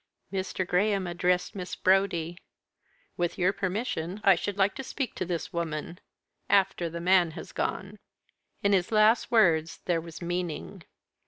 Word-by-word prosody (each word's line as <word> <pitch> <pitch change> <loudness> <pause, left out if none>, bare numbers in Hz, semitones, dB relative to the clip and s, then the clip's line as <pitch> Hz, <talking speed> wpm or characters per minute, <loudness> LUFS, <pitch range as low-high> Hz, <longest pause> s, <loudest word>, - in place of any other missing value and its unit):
Mr. 190 -1 -2
Graham 195 +1 +1
addressed 180 +1 0
Miss 185 -2 -5
Brodie. 185 -3 +1 0.8
"With 175 -1 -1
your 185 +1 +2
permission 190 -2 -3
I 195 - +7
should 195 +3 -3
like 195 0 +3
to 270 - -4
speak 265 0 -4
to - - -3
this 175 +1 -4
woman 170 0 -4 0.5
after 195 -3 +2
the 170 +1 -6
man 180 0 +4
has - - -8
gone." 200 +2 -3 0.6
In 200 0 +3
his 185 0 +1
last 215 +2 +4
words 165 -8 +3
there 170 -2 +1
was 165 -1 -10
meaning. 175 - -4
180 Hz, 150 wpm, -28 LUFS, 170-195 Hz, 0.8 s, I